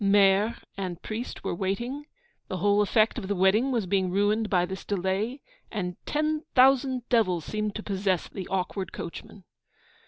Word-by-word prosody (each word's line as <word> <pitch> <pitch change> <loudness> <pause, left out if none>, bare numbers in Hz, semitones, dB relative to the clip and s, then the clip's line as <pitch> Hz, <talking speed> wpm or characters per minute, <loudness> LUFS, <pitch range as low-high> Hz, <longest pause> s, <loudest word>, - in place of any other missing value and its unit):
Maire 200 +2 +4 0.2
and 185 -3 -4
priest 225 +3 -5
were - - -1
waiting, 235 +11 -3 0.4
the 185 - -3
whole 205 +3 +3
effect 215 +3 +2
of 195 - -6
the 205 - 0
wedding 200 +8 +3
was 230 -6 0
being 185 0 +1
ruined 205 +3 +1
by 180 -3 +3
this 190 +1 -6
delay, 200 +7 -2 0.3
and 180 -4 -3
'ten 305 +1 0
thousand 260 -1 +4
devils' 185 -9 +2
seemed 215 -1 -2
to 215 - -5
possess 190 -3 0
the 190 -2 -7
awkward 190 0 -2
coachman. 185 +3 -8
205 Hz, 160 wpm, -27 LUFS, 190-230 Hz, 0.4 s, Maire